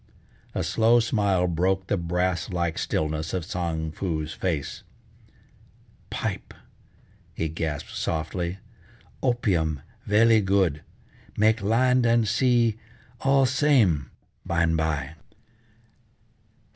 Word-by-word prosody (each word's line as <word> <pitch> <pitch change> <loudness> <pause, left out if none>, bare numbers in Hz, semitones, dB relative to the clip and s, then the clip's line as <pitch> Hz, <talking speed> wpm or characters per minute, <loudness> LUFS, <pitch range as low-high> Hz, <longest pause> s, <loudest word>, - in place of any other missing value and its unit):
A - - 0
slow 115 +1 +3
smile 100 -6 +1
broke 95 +2 0
the 100 - 0
brass 90 0 -1
like 85 -2 -2
stillness 80 +2 -2
of 90 -3 -3
Tsang 80 -3 -3
Foo's 80 -3 -3
face: 80 -7 -3 1.3
"Pipe," - - -4 0.8
he 80 - -1
gasped 80 -2 -4
softly, 85 +3 -2 0.6
"opium 90 - 0 0.3
velly 110 +1 +5
good, 95 -6 +1 0.6
make 110 0 +3
land 125 +4 +3
and 115 -1 +3
sea 115 0 +2 0.4
all 135 0 +3
same 125 - +2 0.3
by 85 0 0
an' 80 0 +2
by!" 80 -3 -1
90 Hz, 100 wpm, -25 LUFS, 80-115 Hz, 1.3 s, velly